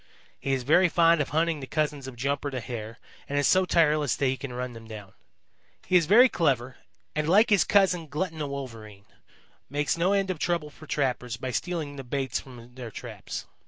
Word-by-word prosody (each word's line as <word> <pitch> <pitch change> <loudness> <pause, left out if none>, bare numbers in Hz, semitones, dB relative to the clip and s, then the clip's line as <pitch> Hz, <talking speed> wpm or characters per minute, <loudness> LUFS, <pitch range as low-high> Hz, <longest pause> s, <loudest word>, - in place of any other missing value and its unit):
He 135 - -2
is 130 -1 -1
very 175 +7 +4
fond 165 -1 +4
of 145 - -2
hunting 160 0 +1
the 135 - -7
cousins 150 -3 -2
of 130 - -8
Jumper 140 +3 -1
the 130 -2 -4
Hare 115 -1 -7 0.3
and 145 - -1
is 145 - +3
so 185 0 +4
tireless 155 -5 +2
that 140 - -1
he 130 0 +2
can 130 0 -7
run 125 0 -4
them 115 -1 -11
down. 105 -3 -10 0.7
He 185 - 0
is 170 -4 +5
very 235 +8 +8
clever 135 - 0 0.4
and, 155 0 0
like 215 +6 +5
his 200 - +5
cousin, 185 -5 +2
Glutton 160 +2 -3
the 150 - -2
Wolverine, 115 -7 -8 0.6
makes 145 +4 -1
no 180 +4 +3
end 195 -1 +1
of 175 - -5
trouble 170 -4 -1
for 155 +2 -14
trappers 125 -4 -1
by 130 +1 -4
stealing 155 -1 -3
the 135 - -6
baits 130 0 -2
from 125 -2 -13
their 125 -2 -7
traps. - - -7
145 Hz, 205 wpm, -27 LUFS, 125-165 Hz, 0.7 s, very